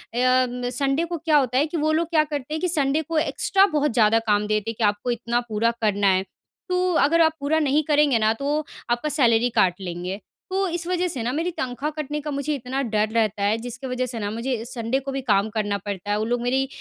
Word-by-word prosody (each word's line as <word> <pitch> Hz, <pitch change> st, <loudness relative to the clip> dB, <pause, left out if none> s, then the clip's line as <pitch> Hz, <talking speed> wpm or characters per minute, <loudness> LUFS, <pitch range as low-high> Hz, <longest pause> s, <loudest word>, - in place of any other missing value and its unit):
अ, 255 Hz, +1 st, +3 dB
म 245 Hz, 0 st, -4 dB
संडे 275 Hz, +5 st, 0 dB
को 340 Hz, 0 st, -4 dB
क्या 310 Hz, -1 st, +2 dB
होता 255 Hz, -2 st, +1 dB
है 285 Hz, -, +4 dB
कि 330 Hz, -, -4 dB
वो 310 Hz, +1 st, +1 dB
लोग 330 Hz, +1 st, +1 dB
क्या 310 Hz, -2 st, +3 dB
करते 295 Hz, -1 st, -5 dB
हैं 315 Hz, -, -2 dB
कि 365 Hz, -, +1 dB
संडे 295 Hz, -2 st, +1 dB
को 320 Hz, +1 st, -3 dB
एक्स्ट्रा 390 Hz, +4 st, +2 dB
बहुत 295 Hz, -1 st, +2 dB
ज़्यादा 225 Hz, -1 st, +4 dB
काम 210 Hz, 0 st, +2 dB
देते 215 Hz, +1 st, -1 dB
हैं -, -, -10 dB
कि, 225 Hz, -, 0 dB
"आपको 205 Hz, +4 st, 0 dB
इतना 235 Hz, +1 st, -1 dB
पूरा 225 Hz, +2 st, +1 dB
करना 205 Hz, -2 st, +2 dB
है। 190 Hz, 0 st, +3 dB, 0.5 s
तो 365 Hz, 0 st, +1 dB
अगर 330 Hz, +4 st, +3 dB
आप 320 Hz, -1 st, +4 dB
पूरा 305 Hz, +3 st, +1 dB
नहीं 300 Hz, +1 st, +2 dB
करेंगे 295 Hz, -5 st, +3 dB
ना, 220 Hz, 0 st, +3 dB
तो 290 Hz, +5 st, -2 dB, 0.3 s
आपका 240 Hz, +6 st, 0 dB
सैलरी 245 Hz, -5 st, +3 dB
काट 180 Hz, -2 st, +4 dB
लेंगे।" 180 Hz, +2 st, -5 dB, 0.3 s
तो 385 Hz, 0 st, +1 dB
इस 340 Hz, 0 st, -3 dB
वज़ह 360 Hz, 0 st, 0 dB
से 260 Hz, -9 st, -3 dB
ना, 245 Hz, -, -1 dB
मेरी 330 Hz, +4 st, -1 dB
तनख़्वाह 270 Hz, -1 st, -3 dB
कटने 295 Hz, +1 st, -4 dB
का 300 Hz, 0 st, -5 dB
मुझे 280 Hz, +1 st, -2 dB
इतना 260 Hz, +1 st, -3 dB
डर 215 Hz, 0 st, +2 dB
रहता 215 Hz, -3 st, +1 dB
है, 210 Hz, +2 st, +2 dB
जिसकी 245 Hz, +3 st, -5 dB
वज़ह 255 Hz, 0 st, -1 dB
से 235 Hz, -2 st, -4 dB
ना, 205 Hz, -1 st, -2 dB
मुझे 230 Hz, 0 st, -3 dB
संडे 240 Hz, +2 st, -2 dB
को 275 Hz, 0 st, -6 dB
भी 270 Hz, 0 st, -3 dB
काम 200 Hz, +2 st, +3 dB
करना 205 Hz, -1 st, 0 dB
पड़ता 205 Hz, 0 st, -4 dB
है। 205 Hz, -, +1 dB
वो 215 Hz, -, -1 dB
लोग 240 Hz, +1 st, -1 dB
मेरी 265 Hz, +2 st, +1 dB
255 Hz, 245 wpm, -23 LUFS, 225-300 Hz, 0.5 s, है